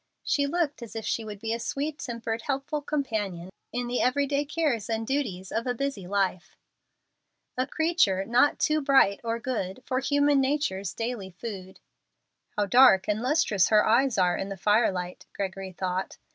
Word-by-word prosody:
She 285 -1 +1
looked 305 -3 -1
as 235 -2 -9
if 225 - -4
she 230 - -1
would 210 -2 -8
be 225 +1 -2
a 230 - -2
sweet 290 +5 -3
tempered, 230 -2 -4
helpful 275 +3 -2
companion, 210 - -3 0.2
in 245 0 -2
the 245 +1 -1
every 270 +3 +2
day 285 +1 0
cares 285 -8 -1
and 225 0 -1
duties 220 -9 -2
of 230 +2 -2
a 245 - 0
busy 260 -8 -3
life: 195 -2 -1 1.0
"A 255 +1 -1
creature 315 - +1
not 245 +5 +3
too 310 0 +1
bright 270 -8 +4
or 230 0 -1
good 235 -3 -4
For 255 - 0
human 285 +1 +3
nature's 265 - -1
daily 225 -4 -4
food." 190 -1 -8 0.8
"How 205 - +2
dark 200 -3 +6
and 210 +1 0
lustrous 250 - +2
her 215 -1 +5
eyes 245 +2 +3
are 180 -2 +3
in 195 - -4
the 195 - -6
firelight!" 190 -3 0
Gregory 190 -1 -4
thought. 185 +1 -3
230 Hz, 175 wpm, -27 LUFS, 195-275 Hz, 1.0 s, dark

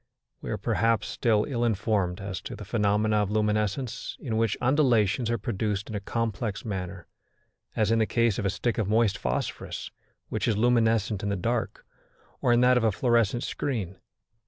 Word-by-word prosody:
We - - -6
are, - - -1
perhaps, 115 -1 +1
still 110 -3 +1
ill 120 -5 -1
informed 100 -5 0
as 95 -2 -5
to - - -7
the - - -9
phenomena 105 0 +1
of 105 -2 +1
luminescence 105 +3 -1
in 115 -6 -3
which 110 -2 +1
undulations 120 -5 +2
are 115 - +1
produced 105 -1 -2
in - - -4
a - - -1
complex 110 0 -3
manner, 95 -4 -5 0.7
as 110 0 +2
in 115 - +3
the 110 - +2
case 115 -4 +1
of - - -2
a - - +2
stick 120 +5 -1
of 105 -3 0
moist 110 -2 +3
phosphorus 65 -7 -3 0.4
which - - -1
is 110 -3 +1
luminescent 115 -3 +2
in 105 - -2
the 100 - 0
dark, 110 +3 -2 0.6
or - - +3
in 120 0 +4
that 125 0 +5
of 125 - +1
a 110 - +3
fluorescent 120 +1 +1
screen. 105 -10 -3
110 Hz, 180 wpm, -27 LUFS, 100-115 Hz, 0.7 s, that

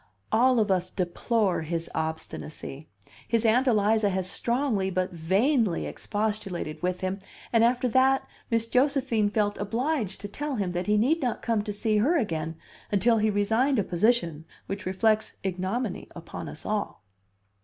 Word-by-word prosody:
"All 250 +2 +4
of 210 -2 +2
us 185 -1 +1
deplore 190 +2 0
his 165 +1 -3
obstinacy. 160 -2 -5 0.4
His 230 0 +1
Aunt 245 +4 +4
Eliza 215 -2 +3
has 190 -1 -1
strongly 235 -3 0
but 185 0 -1
vainly 195 - +1
expostulated 205 -7 -3
with 180 0 -1
him. 185 +1 -2 0.3
And 230 -1 +5
after 245 +2 +3
that, 265 +2 +3 0.2
Miss 230 -2 +1
Josephine 250 -4 +2
felt 205 -1 0
obliged 225 - -1
to 205 - -4
tell 290 +7 -4
him 195 -5 -1
that 180 +2 -3
he 210 0 +3
need 290 +10 +2
not 245 -4 -2
come 230 -3 +1
to 210 0 -4
see 215 +1 0
her 285 +12 +3
again 165 - -2 0.4
until 225 +3 +3
he 215 +1 +2
resigned 225 +7 +2
a 210 - +2
position 175 -5 +1 0.2
which 195 -1 -5
reflects 215 +3 +1
ignominy 190 +4 -2
upon 170 -1 -7
us - - -10
all." 210 - -2
210 Hz, 155 wpm, -27 LUFS, 185-235 Hz, 0.4 s, And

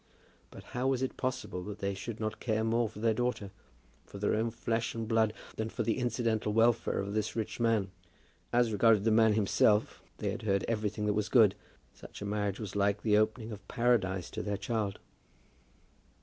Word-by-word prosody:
But - - -12
how 125 +2 0
was 130 -1 +1
it 130 - -2
possible 125 -7 -3
that 105 0 -6
they 100 0 -2
should 105 +3 -6
not 110 -1 -3
care 110 -2 0
more 115 0 +1
for 110 - -14
their 110 +1 +2
daughter, 115 -4 -2 0.5
for - - -11
their 100 +1 0
own 110 +2 +1
flesh 115 0 -2
and 115 -1 -3
blood, 110 -1 +3 0.3
than 110 0 -2
for - - -3
the 115 - 0
incidental 115 -3 0
welfare 115 +1 +3
of 100 +1 -2
this 110 -1 -1
rich 110 0 -3
man? 110 -5 +1 0.6
As 120 -1 +3
regarded 105 0 +4
the 110 - +3
man 110 0 +5
himself 105 0 +2 0.2
they 100 - -2
had 110 - -5
heard 100 -3 0
everything 105 -2 -1
that 105 - +2
was 105 0 -1
good. 110 -6 +6 0.4
Such - - -12
a - - -5
marriage 100 -1 -2
was 105 -3 -6
like 100 0 +1
the 105 -2 +3
opening 110 +2 +1
of 100 -2 -9
paradise 100 -7 +1
to - - -4
their 105 -1 -2
child. 105 -1 -2
110 Hz, 195 wpm, -31 LUFS, 105-115 Hz, 0.6 s, good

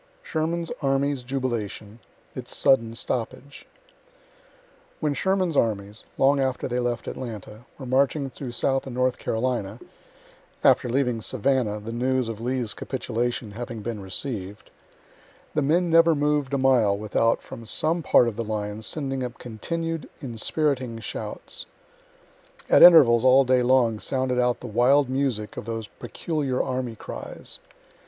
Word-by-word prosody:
SHERMAN'S 165 +1 -2
ARMY'S 140 -1 +1
JUBILATION 120 -4 -4 0.3
ITS - - -5
SUDDEN 115 -4 +3
STOPPAGE 125 +4 -5 1.3
When 150 -2 0
Sherman's 185 +2 0
armies, 105 -3 -1
(long 140 +1 +4
after 130 -2 -1
they 125 -1 -1
left 120 -1 -2
Atlanta,) 110 -2 -7
were 135 - -8
marching 135 +2 +1
through 135 0 -7
Southand 135 +1 -1
North 125 0 +1
Carolina 115 -3 -2 0.8
after 125 - +4
leaving 125 -2 0
Savannah, 125 -3 0
the 110 +2 -7
news 130 0 0
of 110 -1 -6
Lee's 125 -2 -1
capitulation 120 -3 -3
having 115 0 -6
been 115 -2 -4
receiv'd 100 0 -5 0.8
the 150 - +1
men 165 +5 +2
never 165 0 +6
mov'd 145 -2 0
a - - +2
mile 125 -7 +3
without 110 +2 +1
from 115 -1 -10
some 165 +9 0
part 125 - +4
of 110 -2 -4
the 115 - -1
line 105 -1 -4
sending 135 +2 -2
up 125 -1 -5
continued, 165 +8 -4
inspiriting 130 0 -1
shouts. 115 - -6 1.0
At - - +7
intervals 125 -10 +8
all 130 +1 +6
day 130 0 +3
long 120 -3 +3
sounded 130 0 -1
out 125 -1 +1
the - - -8
wild 125 +5 +3
music 130 -6 -2
of - - -5
those 115 -2 -4
peculiar 145 -6 -2
army 125 -3 -2
cries. - - -8
125 Hz, 135 wpm, -25 LUFS, 115-135 Hz, 1.3 s, intervals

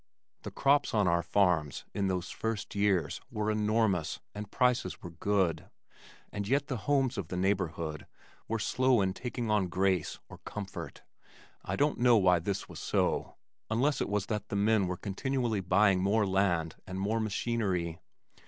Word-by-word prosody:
The - - -6
crops 140 -2 +2
on 105 -3 +3
our 85 0 +3
farms 85 -5 +1
in 100 -1 0
those 90 -1 -2
first 110 -2 -3
years 100 -6 +1
were 110 -3 -1
enormous 105 -5 +1
and 105 -1 -6
prices 125 -7 +1
were 85 - -7
good, 95 0 0 0.6
and 100 -1 -4
yet 140 +5 +2
the 130 - -3
homes 135 -5 +2
of 90 - -4
the 90 - -4
neighborhood 85 -5 -1 0.4
were 115 - -1
slow 130 +1 +2
in 95 -1 +1
taking 120 +1 -3
on 105 -3 +2
grace 95 -2 0
or - - -12
comfort. 100 -2 -7 0.6
I - - -2
don't 145 +1 +1
know 120 -1 +6
why 90 -3 +4
this 95 +3 -3
was - - -9
so, - - 0 0.3
unless 130 +6 +1
it - - -1
was 105 -1 0
that 105 -2 -3
the - - -3
men 100 -1 +3
were 90 0 -3
continually 115 +2 -1
buying 95 +1 +3
more 105 +3 +2
land 95 -4 +1
and 95 0 -5
more 105 +4 0
machinery. 100 -6 -1
100 Hz, 165 wpm, -30 LUFS, 90-115 Hz, 0.6 s, know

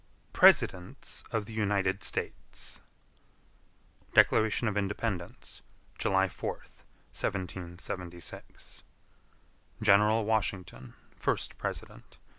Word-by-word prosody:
PRESIDENTS 90 0 +3
OF 110 -2 -1
THE 110 - -9
UNITED 100 -2 +1
STATES. - - -4 1.3
Declaration 110 +2 +5
of 105 - 0
Independence 100 -2 -3 0.4
July 95 0 +3
4th, 90 - -7 0.3
1776 90 -2 -5 1.0
General 105 +1 +5
Washington, 95 - -2 0.2
first - - -1
President. - - -6
100 Hz, 75 wpm, -30 LUFS, 90-105 Hz, 1.3 s, Declaration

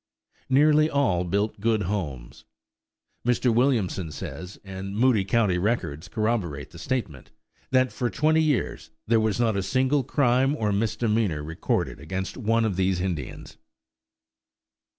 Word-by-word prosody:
Nearly 150 +3 +5
all 125 - +1
built 100 +4 -1
good 110 0 +1
homes. 75 -11 -4 0.8
Mr. 125 0 +2
Williamson 110 - +1
says, 90 +5 -7
and 95 +1 -6
Moody 120 -4 +4
County 100 -3 +1
records 90 -7 -1
corroborate 105 -10 -2
the 85 - -12
statement, 110 - -3 0.4
that 130 -1 +3
for 120 - -2
twenty 155 +8 +2
years 150 -5 -1 0.2
there 115 0 +3
was 110 0 0
not 115 -3 +2
a 100 - 0
single 130 +6 +1
crime 135 +1 +2
or 105 -7 0
misdemeanor 105 -5 0
recorded 80 +2 -2
against 95 0 -4
one 115 -1 +1
of 100 -5 -1
these 95 -1 +1
Indians. 90 -5 -5
110 Hz, 130 wpm, -25 LUFS, 95-125 Hz, 0.8 s, Nearly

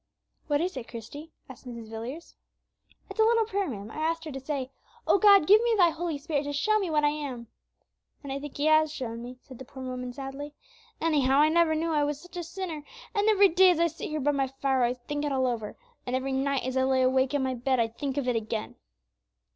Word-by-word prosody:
"What 290 -1 +1
is 365 +2 -2
it, 240 - -6
Christie?" 285 +8 -9 0.2
said - - -19
Mrs. 230 -2 -9
Villiers. 245 +9 -7 0.8
"It's - - -10
a - - +7
little 455 0 +3
prayer, 400 -2 -1
ma'am, 215 -5 -6
I - - -10
asked 325 +1 -1
her 310 - -5
to 270 - -5
say: 270 -1 -4 0.3
'O 400 - +4
God, 400 -5 +7
give 420 +6 +7
me 470 -1 +2
Thy 350 -3 +5
Holy 325 -1 -3
Spirit, 290 -1 -2
to 290 - -3
show 430 +10 +2
me 385 -4 -2
what 305 -1 +1
I 295 - +5
am.'" 275 -6 -5 0.8
"And 275 -1 -5
I 275 - -3
think 290 0 -8
He 290 - 0
has 310 0 +4
shown 235 -5 -5
me," 250 +1 -8
said 260 -4 -13
the - - -7
poor 265 0 -10
woman, 250 -1 -5
sadly; 275 +3 -7 0.4
"anyhow, 280 -5 +2
I 300 +2 +5
never 330 -1 +3
knew 325 +1 -1
I 295 -1 +2
was 290 -1 -2
such 355 +1 -15
a 350 - -3
sinner; 335 -3 -6 0.3
and 415 0 +2
every 405 -2 +6
day 370 +2 +6
as 350 -3 +2
I 340 - +4
sit 330 0 -4
here 305 0 -2
by 290 +1 +2
my 275 -2 0
fire 270 0 0
I 245 +1 +2
think 290 +4 -5
it 295 - -1
all 260 -1 +1
over, 230 -4 -3 0.3
and 250 - -1
every 265 +1 -2
night 270 0 0
as 260 0 -3
I 260 - +3
lie 260 0 +2
awake 260 +1 +2
on 280 - +1
my 260 0 0
bed 255 +1 0
I 230 - +3
think 265 +4 -5
of 275 -3 -1
it 250 - +1
again." 220 -1 -3
285 Hz, 250 wpm, -28 LUFS, 260-325 Hz, 0.8 s, a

